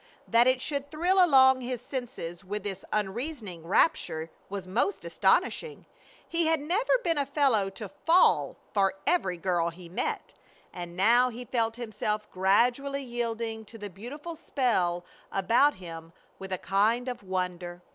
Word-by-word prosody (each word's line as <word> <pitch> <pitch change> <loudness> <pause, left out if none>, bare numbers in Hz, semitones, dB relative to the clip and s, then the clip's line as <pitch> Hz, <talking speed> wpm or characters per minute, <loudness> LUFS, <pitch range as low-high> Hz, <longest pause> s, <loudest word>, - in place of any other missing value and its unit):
That 235 +2 +5
it 255 0 +3
should 280 0 -2
thrill 360 +5 +3
along 265 -5 +6
all 250 -1 -7
his 250 -1 -3
senses 225 -10 -6
with 205 +2 -4
this 195 -2 -5
unreasoning 210 - -3
rapture 160 - +1 0.2
was 195 -2 -5
most 235 - -1
astonishing. 465 -2 +1 0.4
He 335 -1 0
had 320 -1 +2
never 390 +12 +1
been 330 -4 +1
a 280 - +1
fellow 270 -9 +2
to 205 +2 -8
"fall" 330 - +3 0.2
for 195 -3 +2
every 190 - +1
girl 170 -1 0
he 170 0 -12
met, 175 - -3 0.4
and 175 -1 -7
now 240 +6 +5
he 245 +1 -8
felt 225 -1 0
himself 215 -2 -3
gradually 245 +9 +2
yielding 230 -2 -3
to 225 - -11
the 205 -2 -7
beautiful 285 - -8
spell 190 - 0 0.3
about 235 +10 +3
him 165 -3 -10 0.3
with 190 0 -8
a 185 - 0
kind 215 +7 +1
of 250 - -4
wonder. 180 -2 -4
225 Hz, 155 wpm, -28 LUFS, 185-270 Hz, 0.4 s, along